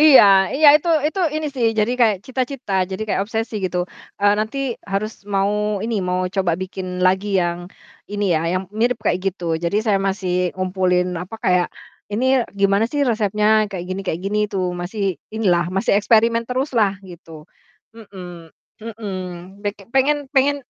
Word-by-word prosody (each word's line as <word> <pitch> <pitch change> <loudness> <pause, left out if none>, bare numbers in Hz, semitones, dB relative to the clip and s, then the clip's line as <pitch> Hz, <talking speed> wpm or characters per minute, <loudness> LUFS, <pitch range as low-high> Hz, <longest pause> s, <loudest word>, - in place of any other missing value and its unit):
Iya 300 -3 +9 0.3
iya, 310 - +5
itu 325 +3 -4 0.2
itu 375 +5 -2 0.2
ini 310 0 -2
sih, 240 -3 +1
jadi 215 +3 +2
kayak 220 -4 +4
cita-cita 260 -3 -4 0.2
jadi 190 +3 -4
kayak 195 - 0
obsesi 225 +1 -3
gitu, 180 -1 -1 0.4
eee, 205 0 +5
nanti 220 +5 -3 0.3
harus 215 +2 -1 0.2
mau 195 +1 +2 0.3
ini, 230 - -2
mau 180 0 0 0.2
coba 185 -3 +2
bikin 190 0 -6 0.2
lagi 190 +2 +2
yang 175 0 -1 0.5
ini 205 0 -1
ya, 155 - +1
yang 185 +1 0 0.2
mirip 245 +1 +2
kayak 180 - +2
gitu. 185 -2 -3 0.2
Jadi 170 +4 0
saya 205 -3 +2
masih 190 -2 -2 0.2
ngumpulin 185 -1 0
apa 185 +5 -7
kayak 180 -1 +3 0.5
ini 230 +5 0 0.4
gimana 200 +2 +3
sih 290 - 0
resepnya 210 -2 +1 0.2
kayak 185 -3 -5
gini 185 +1 -3
kayak 165 +1 -2
gini 205 +2 -1
tuh 190 -2 0 0.2
masih 195 +4 -4 0.3
ini 225 - -3
lah, 175 0 +2
masih 195 - +1
eksperimen 230 +2 +3
terus 260 +3 -1
lah 205 -3 +3 0.2
gitu. 165 -3 -12 0.5
Mhm 180 -7 -11 0.3
mhm. 220 -2 -6 0.5
Pe 205 - 0 0.2
pengen 285 +2 +2
pengen 280 +1 +3
205 Hz, 165 wpm, -20 LUFS, 185-230 Hz, 0.5 s, Iya